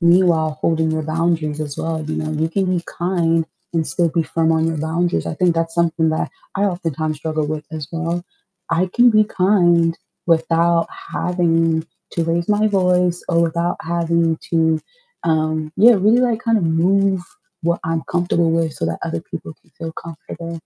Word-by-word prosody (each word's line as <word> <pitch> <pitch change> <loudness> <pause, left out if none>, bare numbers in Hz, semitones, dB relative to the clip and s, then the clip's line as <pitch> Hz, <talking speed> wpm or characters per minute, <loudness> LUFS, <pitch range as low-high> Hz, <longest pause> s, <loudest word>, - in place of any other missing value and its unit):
meanwhile 170 -3 +3
holding 160 -1 +1
your 160 0 -1
boundaries 155 -1 -1
as 145 -2 -5
well, 160 -1 -2
you 155 - -4
know, 155 0 -3
you 155 +1 0
can 190 +2 0
be 180 -2 0
kind 165 -2 0 0.3
and 165 -2 0
still 170 -1 +1
be 165 - +1
firm 165 0 +1
on 160 0 +2
your 165 -1 -1
boundaries. 165 +3 -1
I - - -3
think 175 +1 +2
that's 165 0 -1
something 165 -1 +2
that 160 - -1 0.3
I 195 - -1
oftentimes 165 -5 -2
struggle 155 -1 -2
with 155 0 -4
as 155 -3 -6
well, 170 +2 -2 0.5
I 170 +3 +1
can 240 0 +6
be 215 -1 +5
kind 175 -4 +3 0.3
without 165 0 +2 0.2
having 165 -2 +1 0.3
to 170 - 0
raise 170 +1 -1
my 210 +1 +3
voice 180 -3 +2
or 170 -2 +3
without 170 +1 0
having 170 -1 0
to, 160 -1 +2 0.4
um, 155 -1 0
yeah, 235 +5 +7
really, 215 +3 +4
like, 240 -2 +1
kind 230 -2 +2
of 185 - -1
move 190 +4 +2 0.4
what 170 +1 0
I'm 165 -1 -1
comfortable 175 -1 +1
with 165 -1 +1
so - - -3
that 85 0 -3
other 85 - -3
people - - -8
can - - -29
feel 165 0 -5
comfortable. 165 +1 -8
165 Hz, 180 wpm, -19 LUFS, 160-175 Hz, 0.5 s, yeah